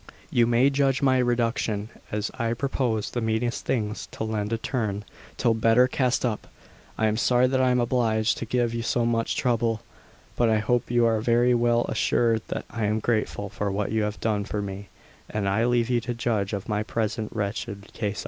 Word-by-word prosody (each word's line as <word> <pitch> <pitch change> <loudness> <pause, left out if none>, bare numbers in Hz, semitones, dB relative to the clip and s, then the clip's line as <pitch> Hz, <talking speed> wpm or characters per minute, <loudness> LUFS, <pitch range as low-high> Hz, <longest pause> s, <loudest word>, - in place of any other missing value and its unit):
You 120 -1 +4
may 120 +4 +4
judge 135 -1 +1
my 130 -1 +4
reduction, 115 -3 0 0.2
as 105 0 -2
I 115 -2 -1
propose 120 -5 -1
the 120 - -2
meanest 110 +2 -1
things 105 -3 -2
to - - -6
lend 110 -1 -2
a 115 - +1
turn 110 -4 -2 0.3
till 115 - +3
better 115 +3 +4
cast 130 -1 0
up. 110 -4 -2 0.5
I 110 - +1
am 110 0 +1
sorry 125 +1 +3
that 130 0 +2
I 130 - +3
am 125 0 +3
obliged 115 -2 +1
to - - -3
give 120 0 0
you 115 - -2
so 115 +1 0
much 115 -1 0
trouble, 115 -3 0 0.5
but 120 -2 +2
I 110 - +3
hope 120 +3 0
you 120 0 +3
are 110 -2 +2
very 120 +2 +3
well 120 0 +2
assured 115 -2 +1
that - - -4
I 115 -2 -2
am 105 +1 +1
grateful 110 -2 -1
for 100 +1 -3
what 100 +1 -2
you 110 0 +1
have 105 0 -2
done 105 -2 0
for 105 +1 -4
me, 100 0 -6 0.4
and 105 -2 -2
I 105 +4 +2
leave 120 -1 +2
you 120 -1 +2
to 120 +1 -4
judge 110 -4 -1
of 100 -1 -4
my 105 0 0
present 110 0 -2
wretched 100 -1 -4
case. 105 -1 -3
115 Hz, 205 wpm, -25 LUFS, 105-120 Hz, 0.5 s, You